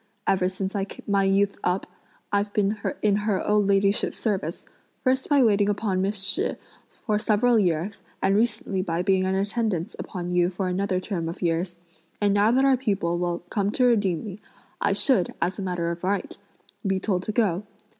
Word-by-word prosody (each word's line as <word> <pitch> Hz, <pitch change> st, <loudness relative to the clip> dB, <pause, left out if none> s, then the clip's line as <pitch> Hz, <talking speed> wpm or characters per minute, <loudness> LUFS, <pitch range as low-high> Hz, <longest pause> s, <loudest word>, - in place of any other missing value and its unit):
Ever 185 Hz, -1 st, +2 dB
since 190 Hz, +1 st, -4 dB, 0.3 s
my 200 Hz, -1 st, +2 dB
youth 195 Hz, +1 st, +2 dB
up, 180 Hz, +2 st, 0 dB, 0.5 s
I've 205 Hz, 0 st, +1 dB
been 205 Hz, 0 st, +1 dB, 0.3 s
in 205 Hz, -1 st, +3 dB
her 210 Hz, -2 st, -1 dB
old 210 Hz, -1 st, +3 dB
ladyship's 200 Hz, +1 st, +2 dB
service; 190 Hz, -7 st, -2 dB, 0.4 s
first 260 Hz, 0 st, +1 dB
by 285 Hz, -3 st, +5 dB
waiting 205 Hz, -3 st, +3 dB
upon 200 Hz, -2 st, 0 dB
Miss 195 Hz, 0 st, 0 dB
Shih 190 Hz, 0 st, 0 dB, 0.5 s
for 210 Hz, -4 st, +1 dB
several 225 Hz, +2 st, +3 dB
years, 180 Hz, +1 st, 0 dB, 0.2 s
and 195 Hz, -, +2 dB
recently 215 Hz, -3 st, 0 dB
by 175 Hz, -1 st, -1 dB
being 190 Hz, -1 st, +2 dB
in 190 Hz, 0 st, 0 dB
attendance 200 Hz, -3 st, -1 dB
upon 180 Hz, -1 st, -5 dB
you 175 Hz, 0 st, +3 dB
for 185 Hz, +1 st, -3 dB
another 185 Hz, 0 st, 0 dB
term 180 Hz, -4 st, -3 dB
of 170 Hz, -, -7 dB
years; 175 Hz, +1 st, -1 dB, 0.4 s
and 205 Hz, -1 st, +2 dB
now 205 Hz, +2 st, +4 dB
that 260 Hz, +3 st, +3 dB
our 270 Hz, -1 st, +4 dB
people 195 Hz, -8 st, -1 dB
will 175 Hz, -1 st, -2 dB
come 200 Hz, -1 st, +1 dB
to 255 Hz, -, +3 dB
redeem 200 Hz, -9 st, +2 dB
me, 205 Hz, -2 st, -7 dB, 0.4 s
I -, -, +2 dB
should, 245 Hz, -, +2 dB
as 185 Hz, +3 st, -1 dB
a -, -, -2 dB
matter 175 Hz, -3 st, -1 dB
of 170 Hz, +1 st, -7 dB
right, 195 Hz, +2 st, -1 dB, 0.5 s
be 195 Hz, -2 st, 0 dB
told 185 Hz, -2 st, 0 dB
to 215 Hz, -, -3 dB
go. 205 Hz, -4 st, +1 dB
195 Hz, 185 wpm, -25 LUFS, 180-210 Hz, 0.5 s, by